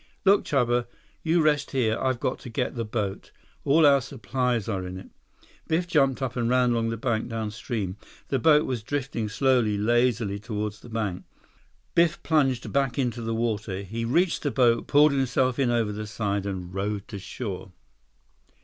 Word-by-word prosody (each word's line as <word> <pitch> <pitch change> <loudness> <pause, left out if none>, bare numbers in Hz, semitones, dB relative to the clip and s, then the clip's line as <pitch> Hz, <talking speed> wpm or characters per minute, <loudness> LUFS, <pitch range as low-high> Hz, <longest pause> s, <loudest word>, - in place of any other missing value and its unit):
"Look, 200 +1 +5
Chuba. 120 -3 +1 0.3
You 165 0 +2
rest 150 -2 +2
here. 115 -5 +1
I've 130 -2 0
got - - -2
to - - -9
get 125 +2 -2
the 120 -3 -3
boat. 105 -3 -4 0.3
All 155 +3 +4
our 140 -1 +6
supplies 125 -3 -2
are 95 -4 -2
in 90 0 -6
it." 95 - -11 0.6
Biff 165 +2 +1
jumped 135 -6 +2
up 125 -2 -3
and 120 -2 0
ran 125 -1 +3
along 115 -1 +1
the 115 - -3
bank 115 0 -1
downstream. 110 -3 -4 0.3
The 135 - +1
boat 150 +3 +5
was 125 -4 -2
drifting 125 -3 -3
slowly, 120 -3 +2
lazily 115 -2 +1
toward 105 -1 -3
the 110 +3 -14
bank. 105 -5 -3 0.7
Biff 170 -1 +2
plunged 135 -6 +1
back 135 -2 +1
into 120 -3 -1
the 115 0 -2
water. 110 -4 -2
He 115 +4 -4
reached 170 +10 +1
the 145 - 0
boat, 120 -4 +2
pulled 150 +1 +5
himself 130 -1 +1
in 130 -3 +2
over 115 -3 +1
the 105 +1 -5
side, 100 -2 -2
and 90 -2 -5
rowed 100 +1 -3
to 100 -4 -6
shore. 95 -2 -6
120 Hz, 175 wpm, -26 LUFS, 105-135 Hz, 0.7 s, our